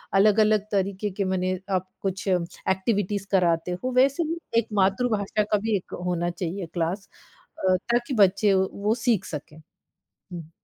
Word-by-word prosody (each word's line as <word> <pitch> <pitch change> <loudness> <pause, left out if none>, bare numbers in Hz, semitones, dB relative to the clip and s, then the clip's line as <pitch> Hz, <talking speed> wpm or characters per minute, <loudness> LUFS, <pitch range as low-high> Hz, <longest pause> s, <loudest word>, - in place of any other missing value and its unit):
अलग-अलग 210 +1 +4
तरीके 200 +1 -1
के 200 - +2
मने 185 0 0 0.2
आप 185 +1 -6
कुछ 195 +1 -3
एक्टिविटीज़ 190 +3 -1
कराते 175 -2 +2
हो, 255 - -1
वैसे 275 +6 +3
ही 330 +1 -3 0.2
एक 230 - -3
मातृभाषा 205 +1 +1
का 210 0 +1
भी 220 +1 0
एक 185 - -11
होना 175 -1 0
चाहिए 175 +2 -4
क्लास 180 +4 -2 0.6
अ, 185 - +5 0.2
ताकि 240 +3 0
बच्चे 200 0 +4
वो 190 0 +2
वो 210 +1 +3
सीख 230 -7 +2
सकें। 150 0 -7 0.5
हुँ। 170 -4 -11
195 Hz, 150 wpm, -25 LUFS, 185-215 Hz, 0.6 s, अ